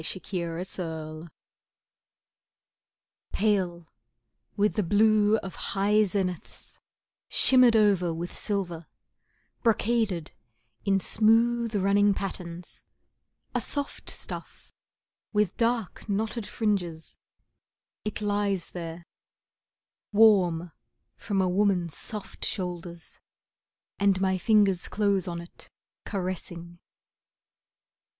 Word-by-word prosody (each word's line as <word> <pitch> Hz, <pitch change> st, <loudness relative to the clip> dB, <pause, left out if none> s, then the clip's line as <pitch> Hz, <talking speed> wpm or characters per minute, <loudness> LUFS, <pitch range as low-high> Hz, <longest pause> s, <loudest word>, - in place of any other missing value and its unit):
The 175 Hz, +4 st, -2 dB
Blue 170 Hz, -2 st, -2 dB
Scarf 160 Hz, -3 st, -6 dB, 2.0 s
Pale, 185 Hz, -5 st, 0 dB, 0.7 s
with 210 Hz, +1 st, +2 dB
the 210 Hz, -, +1 dB
blue 210 Hz, +2 st, +4 dB
of 190 Hz, -, -6 dB
high 205 Hz, +2 st, +2 dB
zeniths, 185 Hz, -3 st, -4 dB, 0.5 s
shimmered 255 Hz, -3 st, +5 dB
over 200 Hz, -5 st, +3 dB
with 170 Hz, +2 st, -5 dB
silver, 175 Hz, -6 st, -3 dB, 0.7 s
brocaded 220 Hz, -7 st, +1 dB, 0.5 s
In 195 Hz, -1 st, +3 dB
smooth, 230 Hz, +3 st, +3 dB
running 200 Hz, +1 st, +3 dB
patterns, 180 Hz, -3 st, -6 dB, 0.7 s
a -, -, 0 dB
soft 285 Hz, -1 st, -4 dB
stuff, -, -, -7 dB, 0.6 s
with 210 Hz, -2 st, +1 dB
dark 230 Hz, -3 st, -1 dB
knotted 215 Hz, +2 st, -2 dB
fringes, 180 Hz, -7 st, -2 dB, 0.8 s
it 215 Hz, 0 st, -4 dB
lies 205 Hz, -3 st, -1 dB
there, 170 Hz, -1 st, -7 dB, 1.1 s
Warm 185 Hz, -6 st, +4 dB, 0.4 s
from 195 Hz, -2 st, -1 dB
a -, -, +2 dB
woman's 180 Hz, -4 st, +1 dB
soft 210 Hz, -3 st, -2 dB
shoulders, 175 Hz, -3 st, -4 dB, 0.8 s
and 200 Hz, -1 st, +3 dB
my 190 Hz, -1 st, +1 dB
fingers 200 Hz, -4 st, +3 dB
close 200 Hz, -2 st, +1 dB
on 170 Hz, -1 st, -3 dB
it, 170 Hz, -, -13 dB, 0.4 s
caressing. 175 Hz, -3 st, -4 dB
195 Hz, 90 wpm, -27 LUFS, 175-210 Hz, 2.0 s, shimmered